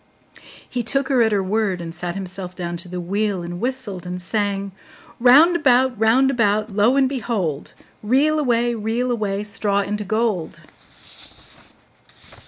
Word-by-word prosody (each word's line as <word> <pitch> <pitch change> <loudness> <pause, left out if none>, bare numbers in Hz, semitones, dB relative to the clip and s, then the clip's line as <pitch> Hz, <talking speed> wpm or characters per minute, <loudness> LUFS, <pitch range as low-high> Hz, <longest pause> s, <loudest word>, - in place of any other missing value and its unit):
He 250 - -3
took 270 +4 0
her 260 -3 +3
at 220 -1 +3
her 200 -2 +1
word, 200 -1 -1
and 165 -1 -7
sat 175 +1 -5
himself 185 -1 -6
down 175 -1 -4
to 175 +1 -7
the 180 0 -5
wheel, 195 +1 -2
and 175 +1 -6
whistled 245 -8 -3
and 180 0 -4
sang: 200 +1 -2 0.5
'Round 285 +9 +6
about, 255 -5 +2
round 250 +5 +4
about, 215 -3 +1
Lo 220 +5 +3
and 275 -1 +3
behold! 215 - -3 0.3
Reel 280 +8 +2
away, 240 -4 +1
reel 230 +3 -1
away, 205 -3 -2
Straw 205 -1 -1
into 210 +1 -3
gold! 215 -4 -1
215 Hz, 150 wpm, -21 LUFS, 190-245 Hz, 0.5 s, Round